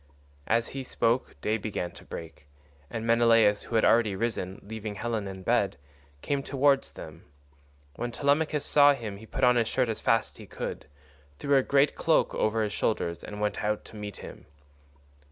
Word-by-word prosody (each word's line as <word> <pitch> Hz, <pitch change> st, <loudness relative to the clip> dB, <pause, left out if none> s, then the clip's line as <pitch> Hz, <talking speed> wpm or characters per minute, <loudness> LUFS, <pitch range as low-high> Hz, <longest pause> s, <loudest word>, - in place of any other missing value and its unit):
As 115 Hz, +1 st, +1 dB
he 135 Hz, -1 st, -5 dB
spoke 120 Hz, -, -1 dB
day 110 Hz, +1 st, 0 dB
began 100 Hz, -4 st, -4 dB
to -, -, -14 dB
break, 80 Hz, -3 st, -9 dB, 0.4 s
and 115 Hz, 0 st, -4 dB
Menelaus, 115 Hz, -3 st, +4 dB
who 115 Hz, -, -6 dB
had 110 Hz, -, +4 dB
already 110 Hz, -4 st, +4 dB
risen, 100 Hz, -3 st, -3 dB
leaving 110 Hz, 0 st, -6 dB
Helen 110 Hz, -1 st, -3 dB
in 95 Hz, -1 st, -8 dB
bed, 100 Hz, -2 st, +1 dB, 0.5 s
came 140 Hz, -1 st, -1 dB
towards 135 Hz, 0 st, +1 dB
them. 80 Hz, +1 st, -10 dB, 0.7 s
When 120 Hz, 0 st, -3 dB
Telemachus 145 Hz, +3 st, +1 dB
saw 145 Hz, -1 st, +6 dB
him 110 Hz, -6 st, -6 dB
he 110 Hz, +2 st, -13 dB
put -, -, -4 dB
on 125 Hz, -1 st, +5 dB
his 115 Hz, -2 st, +2 dB
shirt 125 Hz, 0 st, 0 dB
as 110 Hz, -, -3 dB
fast 115 Hz, -1 st, +1 dB
as -, -, -18 dB
he -, -, -11 dB
could, -, -, -6 dB, 0.5 s
threw 140 Hz, 0 st, +1 dB
a 135 Hz, -, +6 dB
great 140 Hz, +2 st, +3 dB
cloak 160 Hz, 0 st, +2 dB
over 110 Hz, +1 st, +1 dB
his 105 Hz, -1 st, -2 dB
shoulders, 85 Hz, -6 st, -1 dB
and 105 Hz, 0 st, -7 dB
went 105 Hz, -1 st, -1 dB
out 105 Hz, 0 st, -1 dB
to -, -, -13 dB
meet 105 Hz, -2 st, -7 dB
him. -, -, -11 dB
115 Hz, 185 wpm, -28 LUFS, 105-125 Hz, 0.7 s, saw